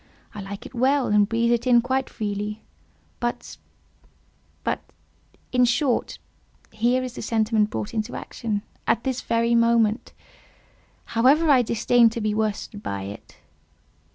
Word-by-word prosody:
I 210 - -7
like 200 +3 -8
it - - -10
well, 260 +2 +2
and 210 0 +3
breathe 235 +1 +1
in 245 -1 +6
it 235 - +3
quite 260 +1 -1
freely;—but—but, 210 +3 -6 1.9
in 250 0 +3
short, 245 +1 0 0.5
here 240 +4 +1
is 250 -2 -5
the - - -7
sentiment 220 -1 +1
brought 210 - -4
into 220 +1 -3
action, 210 -4 -4 0.2
at 230 +1 +2
this 260 -2 -2
very 230 0 +1
moment; 230 -1 +2 0.9
however, 280 +7 +3
I 260 -3 +6
disdain 235 +1 +3
to 225 - -5
be 215 -1 0
worsted 210 -1 -2
by 100 - -4
it. 100 +1 -10
230 Hz, 130 wpm, -24 LUFS, 215-245 Hz, 1.9 s, in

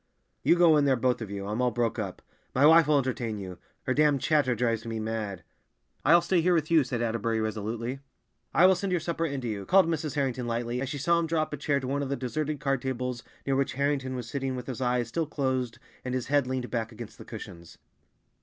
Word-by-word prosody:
"You - - +4
go 170 -3 +6
in 145 - +3
there, 135 -2 +4
both 125 0 0
of 110 - -5
you. 100 -1 -5
I'm 105 +4 -2
all 125 - +3
broke 120 -1 -1
up. 100 -4 -5 0.3
My 135 +3 +5
wife 160 +1 +7
will 150 -1 +4
entertain 120 -5 -1
you; 95 -3 -7 0.2
her 130 - 0
damn 150 0 +4
chatter 140 -3 +2
drives 115 -1 0
me 115 -1 -4
mad!" 110 -4 -4 0.6
"I'll 170 +4 +6
stay 175 0 +2
here 180 +1 +3
with 155 -1 0
you," 160 -3 +6
said 120 -2 -2
Atterbury 115 0 0
resolutely. 110 +4 -3 0.5
"I 175 - +5
will 190 - +7
send 190 +1 -2
your 180 - +2
supper 165 0 -2
in 140 -3 -4
to 120 - -4
you," 105 -3 -3
called 190 - +5
Mrs. 155 -3 -2
Harrington 130 -4 -1
lightly, 120 +1 -2
as 135 - -3
she 145 - -4
saw 170 +5 +2
him 165 - -1
draw 160 -1 +1
up 155 - -8
a - - -2
chair 140 0 0
to 130 - -5
one 140 +2 -1
of 140 - -3
the 140 - 0
deserted 145 +4 -3
card 135 -2 0
tables 125 -1 -3 0.2
near 135 - +1
which 135 0 0
Harrington 140 -1 -1
was 125 -2 -5
sitting 135 +1 -3
with 125 - -6
his 130 -1 -5
eyes 125 -1 +1
still 160 +6 -2
closed 130 -5 -1 0.3
and 125 0 -3
his 130 - -2
head 145 -2 +3
leaned 130 -1 -3
back 115 -1 -2
against 115 0 -10
the - - -8
cushions. 85 -1 -10
130 Hz, 245 wpm, -28 LUFS, 115-150 Hz, 0.6 s, wife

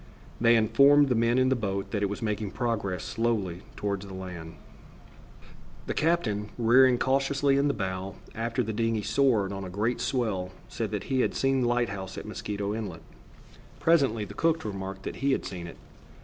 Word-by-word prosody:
They 115 0 +6
informed 140 +6 +5
the - - +3
men 115 +1 +2
in 130 0 +4
the 130 - +3
boat 100 -4 -3
that 105 - -1
it 100 - +1
was 100 +2 -5
making 105 -2 -2
progress 105 -7 -2
slowly 105 -7 -1
toward 100 -2 -2
the 100 -1 -8
land. 90 -3 -7 1.3
The - - -2
captain, 115 -11 0
rearing 125 +2 +5
cautiously 135 +2 +2
in 140 +1 +3
the 140 - +1
bow, 95 -1 -4 0.2
after 115 +2 -1
the 110 0 -3
dingey 115 -1 0
soared 115 -9 +2
on 95 0 -5
a 95 - -6
great 105 +6 -1
swell, 105 -8 -1 0.2
said 110 -2 -3
that 105 -2 -3
he 130 -1 0
had - - 0
seen 135 -1 +2
the 120 - +2
light 120 -1 +1
house 95 -1 -6
at - - -6
Mosquito 105 -1 -4
Inlet. 105 -6 -5 0.8
Presently 135 -10 +3
the - - -10
cook 165 -3 +1
remarked 95 -2 -5
that - - -5
he 135 +1 +1
had - - -2
seen 90 -3 -6
it. 85 - -10
110 Hz, 190 wpm, -28 LUFS, 100-130 Hz, 1.3 s, They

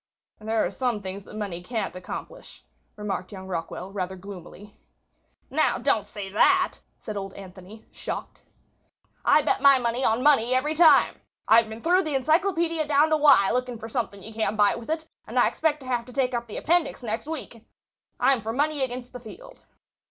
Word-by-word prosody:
"There 220 +1 0
are - - -3
some 245 -4 -1
things 195 0 -7
that - - -12
money 200 -5 -4
can't 220 0 -4
accomplish," 185 - -9 0.3
remarked 210 -2 -4
young 190 -2 -9
Rockwall, 185 +1 -5
rather 190 -2 -3
gloomily. 195 +1 -11 0.8
"Now, - - +2
don't - - 0
say 205 -3 -7
that," 370 - +3 0.2
said 215 - -7
old 195 -1 -5
Anthony, 195 +2 -12
shocked. - - -6 0.8
"I 305 - +5
bet 285 - 0
my 280 -1 +7
money 240 +1 -1
on 230 +2 +2
money 255 -4 +4
every 295 +4 +1
time. 315 -1 +5 0.3
I've 225 0 +5
been 220 +1 -9
through 360 +3 +4
the 310 -5 -2
encyclopaedia 325 +2 +1
down 300 +2 +3
to 310 - +4
Y 285 -10 +5
looking 250 -1 -2
for 220 - -8
something 215 -5 -4
you 220 - -10
can't 220 -1 -1
buy 205 -1 +4
with 235 +2 -8
it; 315 0 -2 0.2
and - - -5
I - - +5
expect 300 -2 0
to - - -11
have 245 -2 -1
to 250 - -13
take 255 -1 0
up 235 0 -3
the 210 - -5
appendix 335 -5 0
next 225 +4 -3
week. 270 -8 -7 0.6
I'm 270 -4 +3
for 220 +2 -4
money 295 +2 0
against 250 -1 -5
the 250 - -7
field. - - -13
235 Hz, 190 wpm, -25 LUFS, 205-295 Hz, 0.8 s, my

